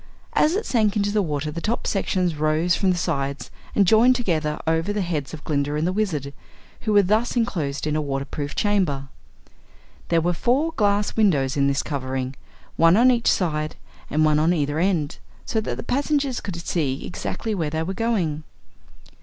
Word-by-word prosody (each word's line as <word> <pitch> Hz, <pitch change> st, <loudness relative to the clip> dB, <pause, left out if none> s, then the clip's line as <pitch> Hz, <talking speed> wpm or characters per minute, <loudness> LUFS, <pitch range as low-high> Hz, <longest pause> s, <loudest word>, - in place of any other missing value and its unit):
As 310 Hz, +4 st, +3 dB
it 430 Hz, +2 st, -1 dB
sank 215 Hz, -5 st, +1 dB
into 205 Hz, 0 st, +1 dB
the 210 Hz, 0 st, +2 dB
water 150 Hz, -3 st, -2 dB
the 170 Hz, -, -5 dB
top 225 Hz, +6 st, -2 dB
sections 185 Hz, -3 st, 0 dB
rose 155 Hz, +3 st, +1 dB
from 195 Hz, -, +1 dB
the 180 Hz, -, +2 dB
sides 140 Hz, -6 st, -2 dB, 0.2 s
and 200 Hz, -, +5 dB
joined 230 Hz, +6 st, +5 dB
together 160 Hz, -10 st, -1 dB
over 165 Hz, +4 st, +1 dB
the 205 Hz, 0 st, -1 dB
heads 155 Hz, -6 st, -3 dB
of 160 Hz, -2 st, -9 dB
Glinda 145 Hz, -1 st, -1 dB
and 155 Hz, +2 st, 0 dB
the 180 Hz, -, 0 dB
Wizard, 155 Hz, -10 st, -2 dB, 0.5 s
who 215 Hz, -, -1 dB
were 205 Hz, -1 st, +6 dB
thus 215 Hz, +7 st, +1 dB
enclosed 165 Hz, -, -1 dB
in 150 Hz, 0 st, 0 dB
a 155 Hz, -, +1 dB
water 135 Hz, -1 st, -2 dB
proof 145 Hz, -1 st, -5 dB
chamber. 180 Hz, -11 st, 0 dB, 1.0 s
There 170 Hz, -, +3 dB
were 175 Hz, +2 st, +1 dB
four 265 Hz, -, +1 dB
glass 205 Hz, -5 st, +1 dB
windows 150 Hz, -12 st, +2 dB
in 140 Hz, -1 st, +2 dB
this 140 Hz, -1 st, 0 dB
covering, 130 Hz, -2 st, -3 dB, 0.4 s
one 165 Hz, +3 st, +5 dB
on 250 Hz, +3 st, +6 dB
each 235 Hz, -2 st, +2 dB
side 155 Hz, -4 st, -1 dB, 0.3 s
and 155 Hz, +1 st, +2 dB
one 150 Hz, -1 st, +3 dB
on 165 Hz, +3 st, +3 dB
either 145 Hz, 0 st, -1 dB
end, 170 Hz, -5 st, 0 dB, 0.3 s
so 220 Hz, -, -1 dB
that -, -, -4 dB
the -, -, -5 dB
passengers 280 Hz, -1 st, 0 dB
could 190 Hz, -, -5 dB
see 155 Hz, -5 st, -2 dB
exactly 220 Hz, +4 st, -4 dB
where 165 Hz, -7 st, -1 dB
they 160 Hz, +1 st, -2 dB
were 185 Hz, +4 st, -3 dB
going. 190 Hz, -9 st, -1 dB
170 Hz, 190 wpm, -23 LUFS, 150-210 Hz, 1.0 s, were